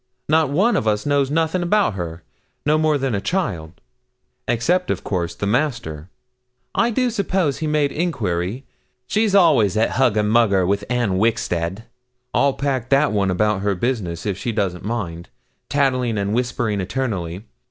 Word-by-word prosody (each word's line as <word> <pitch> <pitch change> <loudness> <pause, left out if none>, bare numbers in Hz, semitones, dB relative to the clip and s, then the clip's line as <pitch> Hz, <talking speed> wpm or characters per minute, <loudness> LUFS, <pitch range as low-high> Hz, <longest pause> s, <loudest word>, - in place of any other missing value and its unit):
Not 155 -1 +3
one 195 +12 +2
of 110 - 0
us 105 -1 +1
knows 140 -2 +2
nothing 160 +4 0
about 195 - +2
her, 85 -3 -6 0.4
no 155 +1 +3
more 155 -1 +2
than 135 -3 -1
a 100 - -1
child; 90 - -2 0.7
except, 180 +10 +1
of - - -2
course, 85 -3 -2
the - - -3
Master 105 - -1 0.6
I 235 - +2
do 245 +1 +1
suppose 190 - 0
he 155 - -2
made 150 -2 +1
enquiry. 115 - -2 0.4
She's 215 - +1
always 140 - +4
at 110 - +2
hugger 110 -5 +3
mugger 105 -3 +3
with 100 +2 0
Anne 120 -7 0
Wixted. 95 -3 0 0.5
I'll 140 +2 +3
pack 130 -4 -2
that 140 +2 +3
one 100 -2 +1
about 105 +2 +1
her 100 0 0
business, 90 -6 -2
if 100 -2 -2
she 120 - -2
doesn't 95 -5 -2
mind. 90 -6 -4 0.4
Tattling 130 -5 +1
and 100 +1 -1
whispering 115 -4 -1
eternally. 95 -5 -3
115 Hz, 160 wpm, -21 LUFS, 100-145 Hz, 0.7 s, always